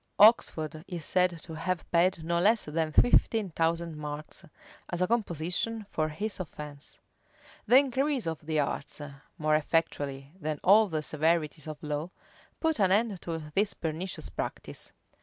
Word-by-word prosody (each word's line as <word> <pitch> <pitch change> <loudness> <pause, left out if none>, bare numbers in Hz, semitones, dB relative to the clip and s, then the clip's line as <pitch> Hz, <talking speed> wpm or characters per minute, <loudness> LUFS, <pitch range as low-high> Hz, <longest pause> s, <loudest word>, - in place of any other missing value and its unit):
Oxford 160 -8 +4
is 170 -5 -5
said 180 -3 +1
to 165 - -9
have 170 +3 -2
paid 175 0 +3
no 170 +1 +1
less 215 +5 +3
than 155 +1 -1
fifteen 220 0 +4
thousand 165 0 0
marks, 150 +3 -6 0.5
as 175 - -3
a 180 - +3
composition 210 +1 -1
for 155 0 0
his 205 +8 -3
offence. 150 -4 -8 0.7
The 250 - +8
increase 275 0 +2
of 160 -2 -4
the 155 0 -1
arts, 140 +1 -3 0.4
more 155 0 +1
effectually 145 -3 -1
than 155 -2 -3
all 210 +3 +7
the 155 -4 -2
severities 155 0 0
of 155 -1 -7
law, 150 +2 -3 0.5
put 320 -4 +1
an 190 -2 +4
end 205 -2 +2
to 160 -3 -5
this 200 +3 +1
pernicious 165 +3 -4
practice. - - -5
165 Hz, 150 wpm, -29 LUFS, 155-195 Hz, 0.7 s, The